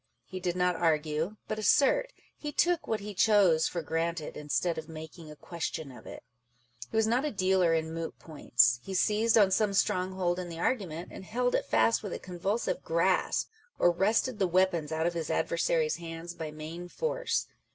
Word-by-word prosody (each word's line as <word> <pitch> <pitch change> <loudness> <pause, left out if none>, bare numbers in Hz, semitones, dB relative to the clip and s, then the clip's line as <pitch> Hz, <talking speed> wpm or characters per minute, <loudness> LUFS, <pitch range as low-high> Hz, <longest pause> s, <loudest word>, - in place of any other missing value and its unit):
He 185 - -7
did 180 -1 -2
not 180 0 +1
argue, 160 +3 0
but 215 - -3
assert; 300 - +3 0.2
he 295 - -6
took 345 +3 +1
what 220 -2 -1
he 205 +1 -6
chose 190 -6 +4
for 170 -2 -4
granted, 165 0 -2
instead 155 +3 -1
of 160 - -10
making 160 0 -9
a 150 - -10
question 160 -2 -5
of 125 - -13
it. - - -9 0.7
He - - -3
was 220 - +4
not 240 +4 +1
a 300 - 0
dealer 185 - +2
in 160 0 -2
moot^points. 135 -7 +1
He 190 +8 -6
seized 220 +4 +3
on 200 -3 +5
some 200 0 +2
stronghold 185 -3 0
in 180 -1 -5
the 165 - -7
argument, 175 -5 -2
and - - -9
held 245 +5 -1
it - - 0
fast 115 0 +3
with - - -5
a - - -3
convulsive 200 - -2
grasp - - +1
â€" - - -49 0.3
or 175 - +4
wrested 215 +6 +1
the 190 - +3
weapons 175 -3 +1
out 160 +1 -1
of 175 - +1
his 165 -3 -4
adversaries' 160 -2 +1
hands 165 0 -7
by 160 -2 -6
main 155 +3 -7
force. - - -1
175 Hz, 190 wpm, -29 LUFS, 160-210 Hz, 0.7 s, on